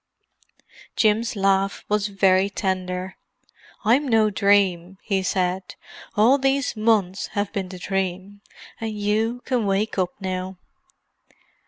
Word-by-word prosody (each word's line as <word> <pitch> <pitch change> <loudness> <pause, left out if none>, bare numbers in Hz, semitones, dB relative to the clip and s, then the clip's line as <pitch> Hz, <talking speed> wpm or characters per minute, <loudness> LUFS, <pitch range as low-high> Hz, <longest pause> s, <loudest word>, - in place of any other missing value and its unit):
Jim's 225 +2 +2
laugh 195 0 +1
was 210 0 +1
very 195 -1 +3
tender. 185 -2 -3 0.7
"I'm 260 +7 +3
no 220 -3 +3
dream," 195 -3 +2
he 195 -3 0
said. 185 0 -2 0.4
"All 240 +7 +5
these 270 -1 0
months 215 -4 +1
have 205 0 -1
been 195 -3 -3
the 185 - -8
dream—and 195 +4 -5
you 220 +4 0
can 245 -5 0
wake 195 +1 0
up 180 -1 -1
now." 185 -1 -4
200 Hz, 115 wpm, -23 LUFS, 190-215 Hz, 0.7 s, All